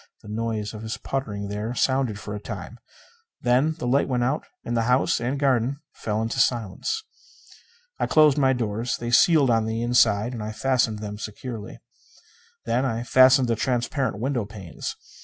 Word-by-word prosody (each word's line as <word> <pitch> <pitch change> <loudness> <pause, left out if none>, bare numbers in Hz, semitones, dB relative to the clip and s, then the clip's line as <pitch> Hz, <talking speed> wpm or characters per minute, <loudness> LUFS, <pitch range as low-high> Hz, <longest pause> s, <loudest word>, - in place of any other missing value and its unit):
The - - -11
noise 110 -1 -3
of 110 - -8
his 110 0 -4
puttering 105 -7 -4
there 105 +4 -4
sounded 130 -4 +1
for 105 - -7
a 105 - -4
time. 105 +2 -8 0.6
Then 130 +6 +2
the 160 - -6
light 135 +3 +2
went 125 -2 0
out 135 +5 -1 0.2
and 120 - -2
the 115 - +2
house 125 +2 +3
and 130 +4 -1
garden 135 -1 +1
fell 110 0 -2
into 115 - -2
silence. 120 - 0 1.0
I - - +1
closed 155 -3 +5
my 135 -1 +4
doors. 115 -1 -2
They 120 0 -4
sealed 140 0 +5
on 115 -1 +2
the 115 +1 -2
inside, 120 -1 +3
and 115 - -5
I 105 0 -4
fastened 115 -3 0
them 105 0 -6
securely. 110 0 -7 0.9
Then 120 +3 +1
I 120 -3 -1
fastened 130 +1 +6
the 115 - +1
transparent 125 -1 -1
window 125 +1 -1
panes. 100 -4 -7
120 Hz, 175 wpm, -24 LUFS, 110-130 Hz, 1.0 s, fastened